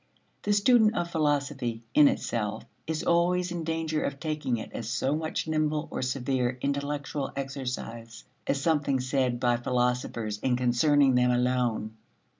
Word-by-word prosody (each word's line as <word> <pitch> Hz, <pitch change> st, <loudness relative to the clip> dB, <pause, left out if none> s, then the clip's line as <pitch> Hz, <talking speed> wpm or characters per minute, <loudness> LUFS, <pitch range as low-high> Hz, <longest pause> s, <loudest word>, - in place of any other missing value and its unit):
The 205 Hz, -, +1 dB
student 220 Hz, +1 st, +4 dB
of 170 Hz, 0 st, -2 dB
philosophy 140 Hz, -7 st, -1 dB
"in 150 Hz, -1 st, +7 dB
itself" 110 Hz, -5 st, -2 dB, 0.2 s
is 160 Hz, -1 st, -2 dB
always 175 Hz, +1 st, +2 dB
in 170 Hz, -1 st, -3 dB
danger 160 Hz, -1 st, -1 dB
of 140 Hz, 0 st, -3 dB
taking 150 Hz, -6 st, -1 dB
it 110 Hz, -, -7 dB
as 115 Hz, -1 st, -5 dB
so 135 Hz, +4 st, 0 dB
much 160 Hz, 0 st, -3 dB
nimble 155 Hz, -1 st, 0 dB
or -, -, -3 dB
severe 130 Hz, -1 st, -1 dB
intellectual 140 Hz, +1 st, -2 dB
exercise 125 Hz, -4 st, -5 dB, 0.2 s
as 140 Hz, -, +1 dB
something 145 Hz, -3 st, +1 dB
said 130 Hz, -1 st, 0 dB
by 120 Hz, -1 st, +2 dB
philosophers 120 Hz, -3 st, -1 dB
and 125 Hz, -2 st, +1 dB
concerning 130 Hz, +3 st, +3 dB
them 125 Hz, 0 st, +3 dB
alone. 120 Hz, -3 st, 0 dB
135 Hz, 145 wpm, -28 LUFS, 125-155 Hz, 0.2 s, in